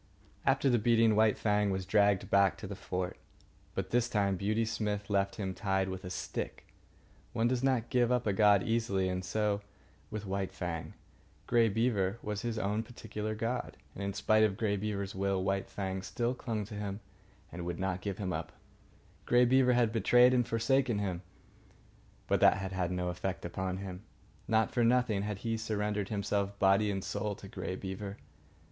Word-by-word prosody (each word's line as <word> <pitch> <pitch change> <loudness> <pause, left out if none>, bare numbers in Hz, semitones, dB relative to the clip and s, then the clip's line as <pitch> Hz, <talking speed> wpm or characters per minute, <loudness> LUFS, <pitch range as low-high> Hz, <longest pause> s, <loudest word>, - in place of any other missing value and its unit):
After 135 +1 +3
the 120 -3 +4
beating, 115 0 +4
White 110 -1 +4
Fang 105 -1 +2
was 95 -1 -2
dragged 100 -1 +2
back 100 -1 +4
to - - -8
the 100 - -5
fort. 90 -1 -4 0.6
But - - -3
this 120 0 +2
time 100 -3 +1
Beauty 110 +4 0
Smith 105 -2 -2
left 100 -1 +1
him 95 -3 -3
tied 95 0 0
with 95 0 -5
a 90 - -5
stick. 90 - -5 0.6
One 115 +1 +2
does 125 0 0
not 130 -4 +1
give 125 -1 +3
up 125 -1 +1
a 105 - +1
god 100 -1 +5
easily, 110 -5 0
and 90 0 -2
so 105 +2 0 0.5
with 105 -1 -5
White 95 0 -2
Fang. 85 -3 -5 0.5
Grey 115 -1 +4
Beaver 105 -2 +1
was 105 -1 -3
his 115 -2 -3
own 105 +1 0
particular 110 -2 -5
god, 115 +3 -3 0.2
and, 100 - -6
in 100 0 -2
spite 110 +2 +3
of 105 -3 +3
Grey 105 -2 +1
Beaver's 100 -1 -3
will, 95 0 0
White 95 0 -1
Fang 95 -1 -3
still 115 +6 -1
clung 115 -5 -3
to 105 - -10
him 105 -1 -4 0.5
and 90 0 -6
would 85 0 -3
not 95 -1 -1
give 100 -1 -3
him 95 -3 -2
up. - - -4 0.7
Grey 125 0 +5
Beaver 125 0 +4
had 120 -2 +3
betrayed 120 +3 +5
and 125 -2 +2
forsaken 120 0 +2
him, 95 -4 -2 1.0
but - - +1
that - - +6
had 95 -2 -2
no 90 -1 -1
effect 90 +1 -4
upon 95 +1 -3
him. 95 -1 -6 0.5
Not 110 0 +2
for 120 - +1
nothing 120 -4 +3
had 105 -1 -3
he 115 0 0
surrendered 105 -2 -2
himself 100 -1 -1
body 100 +2 +4
and 95 -1 -2
soul 100 0 -2
to 100 - -11
Grey 95 - -5
Beaver. 100 +1 -6
105 Hz, 185 wpm, -32 LUFS, 95-115 Hz, 1.0 s, that